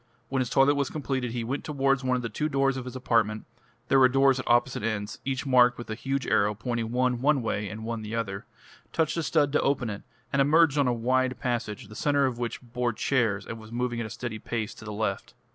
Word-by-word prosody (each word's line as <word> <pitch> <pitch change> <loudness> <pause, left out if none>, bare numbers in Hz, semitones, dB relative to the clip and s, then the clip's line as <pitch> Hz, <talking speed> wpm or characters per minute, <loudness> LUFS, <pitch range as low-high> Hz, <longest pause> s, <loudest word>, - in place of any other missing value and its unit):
When 135 - 0
his 125 -2 0
toilet 135 +2 +4
was 140 -2 0
completed 135 -4 -2
he 120 0 -3
went 130 +5 -3
towards 135 -2 +1
one 130 0 +1
of 125 - -2
the - - -1
two 150 +8 -2
doors 135 -1 +2
of 130 -1 -5
his 125 - -7
apartment 115 -4 +1 0.4
there 135 - +4
were 130 -1 +7
doors 135 0 +4
at 125 - -6
opposite 120 +2 +2
ends, 105 -2 -3
each 135 0 -2
marked 125 -2 +5
with 120 -2 -7
a - - 0
huge 135 +3 -2
arrow 105 +1 +2
pointing 115 0 -3
one 125 0 +1
one 140 -2 +3
way 105 -2 -2
and 110 +3 -7
one 115 -1 -3
the 110 +1 -5
other 100 -4 -4 0.5
touched 160 -2 +1
a 170 - 0
stud 150 -2 +2
to 150 - +2
open 135 -5 0
it, 100 - -6 0.3
and 140 - +3
emerged 150 +1 +4
on 140 - +3
a - - +3
wide 130 +2 0
passage, 115 -5 -3
the 105 - -12
centre 145 +3 +2
of 125 -3 -2
which 120 0 -4
bore 120 0 -2
chairs 110 -6 0
and 115 - -7
was 110 0 -12
moving 120 0 -2
at 115 - -3
a - - -10
steady 115 -1 -5
pace 110 0 -3
to 110 - -13
the 105 - -5
left. 105 -2 -3
125 Hz, 245 wpm, -27 LUFS, 115-135 Hz, 0.5 s, were